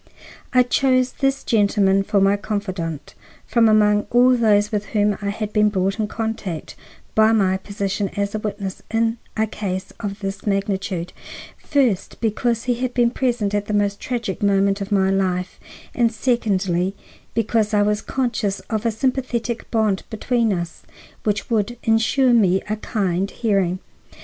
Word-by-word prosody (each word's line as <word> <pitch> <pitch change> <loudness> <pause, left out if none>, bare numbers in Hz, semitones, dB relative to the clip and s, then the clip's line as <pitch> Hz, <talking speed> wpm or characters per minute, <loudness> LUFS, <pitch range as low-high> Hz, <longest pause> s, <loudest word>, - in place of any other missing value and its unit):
I 250 -1 +5
chose 255 0 +2
this 270 0 -1
gentleman 200 -3 +3
for 200 +1 +1
my 195 +1 +4
confidant, 185 -8 -4 0.3
from 230 -2 +3
among 210 -1 +3
all 250 +1 +5
those 210 -3 +3
with 210 -1 -2
whom 205 0 +3
I 200 - -2
had 210 +1 -4
been 210 -1 +4
brought 195 +1 -1
in 215 - 0
contact 215 -7 -4 0.4
by 220 0 +5
my 190 -3 +2
position 200 0 -3
as 200 0 -1
witness 205 -3 -4
in 225 0 0 0.2
a 220 - +3
case 190 -3 -5
of 200 -2 -4
this 195 +1 -5
magnitude, 195 -3 -1 0.4
first, 250 - 0
because 230 +1 0
he 250 - +1
had 250 +1 -3
been 240 -2 +3
present 240 -6 -1
at 205 0 -1
the 210 - -1
most 205 -1 +1
tragic 235 -7 -3
moment 200 0 +2
of 200 +2 -5
my 190 -1 +3
life, 185 -2 -1 0.3
and 235 -2 +2
secondly, 195 -6 0 0.4
because 225 -1 +1
I 205 -1 +3
was 210 0 +1
conscious 235 -6 -1
of 220 +1 0
a - - +2
sympathetic 240 0 -2
bond 215 -4 +1
between 230 0 0
us 175 -3 -4 0.4
which 210 +2 -1
would 230 +2 0
insure 230 +3 +3
me 190 -5 +4
a 215 +1 -2
kind 195 -3 -1
hearing. 195 -6 0
210 Hz, 155 wpm, -21 LUFS, 195-230 Hz, 0.4 s, I